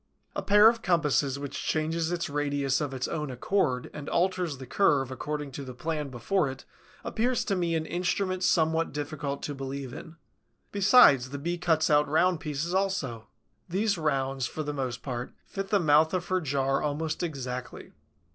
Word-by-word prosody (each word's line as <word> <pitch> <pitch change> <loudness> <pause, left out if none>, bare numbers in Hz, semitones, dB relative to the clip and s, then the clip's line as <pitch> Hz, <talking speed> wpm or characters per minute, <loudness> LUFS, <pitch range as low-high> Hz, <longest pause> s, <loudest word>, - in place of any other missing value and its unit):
A - - -1
pair 210 +1 +6
of 230 0 +3
compasses 150 -7 +1
which 140 -1 -5
changes 160 +1 0
its 175 -1 -1
radius 145 -2 0
of 145 -2 -2
its 130 -1 -3
own 150 -3 -3
accord 125 -1 0
and 150 -1 -6
alters 180 -4 0
the 130 - -8
curve 135 -4 +2
according 150 +2 -4
to 140 +2 -6
the 130 -2 -8
plan 155 0 -3
before 135 - 0
it 130 0 -9 0.4
appears 245 +2 0
to 200 - 0
me 170 -2 0
an 160 -1 -1
instrument 185 +2 -1
somewhat 160 -3 +2
difficult 145 -1 -4
to 145 - -3
believe 135 -1 -5
in. 165 +5 -9 0.6
Besides, 190 - +6
the 140 - -5
Bee 170 +5 -3
cuts 160 -3 +2
out 150 0 +4
round 175 +3 +3
pieces 155 +3 -3
also. 185 - -1 0.4
These 200 +4 +1
rounds, 135 -4 0
for 155 - -5
the 145 0 -3
most 130 -3 -4
part, 125 -2 -5
fit 195 0 -5
the 205 - +3
mouth 155 +1 +4
of 180 -1 -3
her 185 0 +1
jar 135 -2 0
almost 155 +2 -2
exactly. 130 -7 -5
150 Hz, 175 wpm, -28 LUFS, 135-175 Hz, 0.6 s, pair